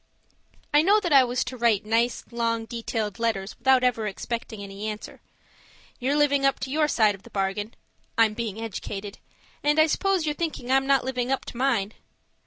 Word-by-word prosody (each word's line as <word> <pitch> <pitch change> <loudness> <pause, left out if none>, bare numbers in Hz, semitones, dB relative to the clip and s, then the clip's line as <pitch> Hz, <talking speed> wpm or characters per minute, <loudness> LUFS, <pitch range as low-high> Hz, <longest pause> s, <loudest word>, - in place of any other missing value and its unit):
I 295 - +7
know 400 +6 +4
that 350 -7 -1
I 270 -2 +8
was 245 0 0
to 250 +1 -6
write 230 -4 +2
nice, 230 +2 +1
long, 230 -1 -1
detailed 225 -2 -4
letters 215 -4 -1
without 265 -1 +4
ever 235 -4 +1
expecting 220 +1 -5
any 200 +2 -6
answer. 215 0 -7 0.8
You're 270 +3 0
living 285 -2 +3
up 275 -1 +2
to 265 - -4
your 305 +1 +2
side 220 -7 +3
of 195 - -12
the - - -15
bargain 200 +3 -2 0.4
I'm 225 -2 +4
being 220 -2 -4
educated 205 -2 -6 0.4
and 295 +1 +2
I 315 - +7
suppose 375 +2 +1
you're 300 - 0
thinking 295 -6 -3
I'm 270 0 +3
not 275 -2 +3
living 255 -1 -2
up 270 - -1
to - - -8
mine! 225 -6 +1
235 Hz, 190 wpm, -25 LUFS, 215-275 Hz, 0.8 s, I